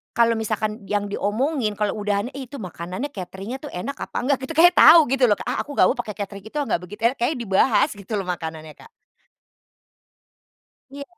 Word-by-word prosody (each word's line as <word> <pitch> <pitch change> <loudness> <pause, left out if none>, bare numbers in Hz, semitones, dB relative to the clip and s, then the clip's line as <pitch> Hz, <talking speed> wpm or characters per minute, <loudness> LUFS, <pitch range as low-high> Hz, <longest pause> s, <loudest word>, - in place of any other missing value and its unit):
kalau 235 -1 +4
misalkan 215 0 -2
yang 205 -1 -1
diomongin, 220 +2 -1
kalau 210 0 -1
udahan 205 +4 -1
itu, 270 0 -8
makanannya 185 - -6
catering-nya 195 +4 -7
tuh 295 - -7
enak, 270 +11 -5
apa - - -5
enggak? 275 +1 +2
Gitu, 325 - -5
kayak 350 +2 +8
tahu 325 -2 +8
gitu 265 -2 +4
loh, 205 - +4
Kak. - - -7
"Ah, - - -1
aku 290 - -9
gak 185 - +6
mau - - -4
pakai 210 - -5
catering 200 -1 -6
itu 260 - -15
ah, 290 - +1
enggak 170 - 0
begitu 210 +4 -11
enak." 245 +3 +2
kayaknya 250 +3 0
dibahas 215 +6 +3
gitu 205 +1 -9
loh - - -3
makanannya, 160 -3 -5
Kak. 460 - -15 2.0
Iya. 280 +1 -7
215 Hz, 200 wpm, -22 LUFS, 200-270 Hz, 2.0 s, kayak